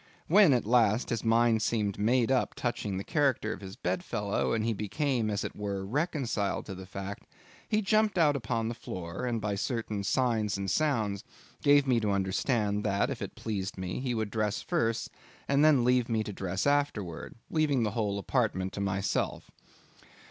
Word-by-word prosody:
When, 195 -1 +6
at 125 -5 +2
last, 115 0 +3
his 115 -2 -1
mind 115 0 +3
seemed 105 -3 0
made 120 +3 +2
up 130 -2 +1
touching 105 -5 -2
the 95 - -3
character 135 -7 +1
of - - -10
his 95 0 -8
bedfellow, 115 - -1
and 110 -1 0
he 115 - +1
became, 115 +3 -1
as 100 -1 -1
it - - -5
were, 100 -2 -3
reconciled 135 - -1
to 100 - -6
the 95 0 -9
fact; 95 +1 -7 0.4
he 215 0 +1
jumped 215 0 +2
out 150 -4 +4
upon 115 -3 -1
the 115 - -2
floor, 90 0 -5
and 120 -2 -1
by 105 -1 -2
certain 110 -1 -2
signs 110 -2 +1
and 100 -1 -2
sounds 110 -10 0 0.4
gave 145 -1 +5
me 125 -3 +3
to 105 -2 -1
understand 100 +2 0
that, 100 -1 +1
if - - -5
it - - -5
pleased 100 -3 -4
me, 95 +2 -4
he 125 -2 -2
would 110 -2 -2
dress 105 -1 0
first 115 -10 -1 0.4
and 140 +1 +3
then 150 -5 +5
leave 125 0 +2
me 110 -1 +1
to 105 - -6
dress 95 0 -2
afterwards, 140 - -1 0.2
leaving 150 -6 +2
the 105 - 0
whole 105 -2 -1
apartment 100 -4 -1
to 100 - -4
myself. 100 0 -1
110 Hz, 185 wpm, -29 LUFS, 100-130 Hz, 0.4 s, When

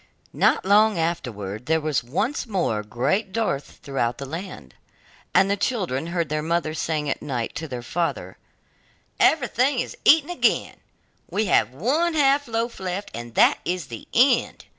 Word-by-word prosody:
Not - - +2
long 210 +1 +4
afterwards, 120 - -3
there 160 +2 +2
was 150 -6 -1
once 215 - -2
more 180 - 0
great 135 - -1
dearth 195 -11 -3
throughout 130 -3 -1
the 140 - -6
land, 155 - -8 0.6
and 195 - +4
the 200 - +1
children 185 - -2
heard 170 -1 -1
their 155 +1 -2
mother 165 0 -1
saying 155 -1 -2
at 140 - -2
night 125 -5 -3
to 160 - -5
their 125 -4 -6
father: 170 +7 -3 0.8
'Everything 260 -1 +3
is - - -3
eaten 315 +2 +5
again, 350 - +1 0.5
we 215 - 0
have 110 - +3
one 280 - 0
half 285 -1 +3
loaf 230 +1 -2
left, 190 +2 -4
and 120 0 -8
that - - +5
is 180 0 -3
the 115 -2 -9
end. 250 +1 +2
170 Hz, 160 wpm, -24 LUFS, 135-220 Hz, 0.8 s, eaten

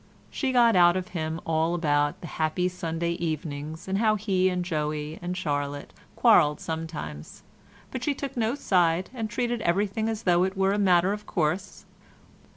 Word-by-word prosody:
She 270 -2 -1
got 235 -3 +5
out 175 0 +6
of 185 -1 -4
him 160 -2 -3
all 165 +1 +1
about 145 -3 +1
the - - -7
happy 160 +2 -1
Sunday 170 -1 -3
evenings, 155 -1 -4
and 190 +1 0
how 215 -1 +3
he 190 -3 +1
and 180 -1 -2
Joey 150 -2 -3
and 180 +1 -4
Charlotte 145 -4 -3 0.2
quarrelled 150 0 +5
sometimes, 160 - -6 0.5
but 255 -1 -5
she 290 0 0
took 275 0 -5
no 230 +1 0
side 180 - +1
and 225 -4 -4
treated 240 +1 -1
everything 205 +4 0
as 225 0 -4
though 175 -1 +3
it 190 +1 -2
were 195 0 +2
a 205 - 0
matter 185 -1 +4
of 210 0 -7
course. 180 +3 -2
175 Hz, 170 wpm, -26 LUFS, 160-205 Hz, 0.5 s, out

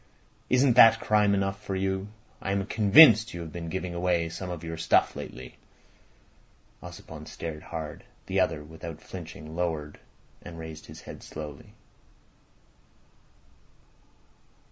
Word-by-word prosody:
Isn't 130 0 +4
that 115 -2 +8
crime 105 -1 +3
enough 95 +1 -2
for 95 - -3
you? 95 +1 -1 0.3
I 95 - -2
am 100 -1 -1
convinced 110 - +7
you 85 - -5
have 80 -2 -7
been 85 0 -6
giving 90 0 -4
away 85 -1 0
some 90 +2 -6
of 85 -2 -6
your 80 0 -5
stuff 80 - +2
lately." 60 0 -9 1.2
Ossipon - - -10
stared 80 -2 -6
hard. 80 -3 -7 0.2
The - - -1
other, 75 - 0
without 80 +1 -9
flinching, 80 -3 -9
lowered 80 -4 -3 0.4
and 85 -1 -10
raised 80 -1 -9
his - - -11
head - - -10
slowly. 75 -2 -9
85 Hz, 130 wpm, -27 LUFS, 80-95 Hz, 1.2 s, that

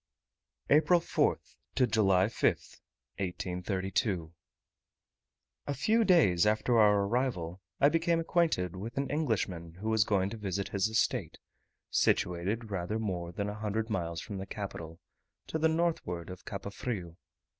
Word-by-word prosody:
APRIL 160 +4 +5
4th - - -1 0.2
to 130 - +4
July 95 -5 +3
5th, 110 - -1 0.4
1832. 95 -1 -2 1.3
A 145 - 0
few 220 - +3
days 105 - +4
after 110 +2 +2
our 105 -2 +5
arrival 100 -7 -1 0.2
I 140 - +6
became 165 +1 +2
acquainted 165 - +1
with 110 +6 -7
an 140 - -1
Englishman 100 - -1
who 105 +5 -4
was 110 -1 +4
going 100 -2 +1
to 115 - -5
visit 100 -2 -3
his 100 0 +1
estate, 110 +1 0 0.5
situated 100 +6 +1
rather 95 +3 -2
more 90 -6 -3
than 100 +3 -3
a 105 - -3
hundred 110 +1 -2
miles 85 -5 -2
from 100 -2 -6
the 95 - -6
capital, 85 -5 -6 0.5
to 160 - -3
the 160 +1 +3
northward 160 - -1
of 90 - -10
Cape 100 0 -6
Frio. 95 -8 -4
105 Hz, 140 wpm, -31 LUFS, 90-125 Hz, 1.3 s, I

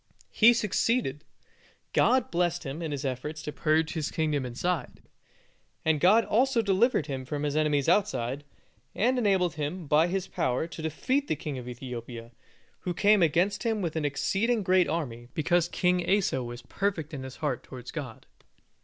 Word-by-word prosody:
He 230 +2 +6
succeeded. 215 - 0 0.7
God 255 -1 +3
blessed 175 0 0
him 140 +5 -5
in 160 -2 -3
his 140 -1 -4
efforts 140 +4 -4
to 150 - -4
purge 155 +1 +1
his 155 -3 -2
kingdom 150 -5 -1
inside, 150 +4 -3 0.8
and 160 -1 +3
God 210 +8 +5
also 240 +1 +2
delivered 200 - +2
him 135 -3 -4
from 145 +2 -4
his 145 0 -1
enemies 150 -3 +1
outside, 145 - +1 0.5
and 250 +4 +2
enabled 190 -6 +2
him 155 +4 -3
by 150 +3 +4
His 190 +1 -2
power 125 +5 -1
to 165 -1 -8
defeat 260 - -1
the - - 0
king 145 -2 -5
of 125 - -9
Ethiopia, 120 -1 -7 0.5
who 180 -2 -4
came 210 +1 +4
against 175 +5 +2
him 220 -4 -1
with 165 -2 -2
an 160 - -1
exceeding 200 - 0
great 185 -2 +3
army, 125 -8 -3
because 175 +2 +2
King 180 0 +1
Asa 190 -10 +2
was 120 0 -7
perfect 180 -6 -2
in 140 - -5
his 130 0 -8
heart 145 -6 -2
towards 125 -2 -10
God. 135 -8 -7
160 Hz, 170 wpm, -28 LUFS, 140-190 Hz, 0.8 s, He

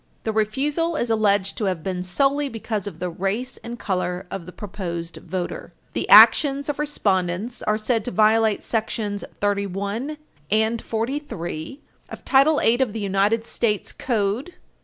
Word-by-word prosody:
The 220 - -1
refusal 285 +10 0
is 240 -6 -1
alleged 205 -3 +1
to 215 - 0
have 185 -5 -1
been 185 -2 -2
solely 275 +10 +1
because 220 -4 -4
of 205 - -7
the 180 - -3
race 200 +9 -3
and 235 +1 -8
color 180 -3 -2
of 185 -3 -6
the - - -8
proposed 175 -4 -6
voter. 185 -2 -5 0.2
The - - -3
actions 280 -1 +7
of 290 - -2
respondents 205 -6 -1
are 215 - +1
said 225 0 0
to - - -2
violate 220 -1 +3
§§ 215 -2 -2 0.2
31 200 +7 -2 0.3
and 220 +2 +1
43 230 - -4 0.3
of - - -10
Title 285 +3 +5
8 - - -2
[Footnote 240 +3 +3
1] 260 - +4
of - - -10
the 225 - -4
United 205 +3 +1
States 210 -3 -1
Code, 225 - -1
8 - - -18
U. - - -29
215 Hz, 170 wpm, -23 LUFS, 195-245 Hz, 0.3 s, actions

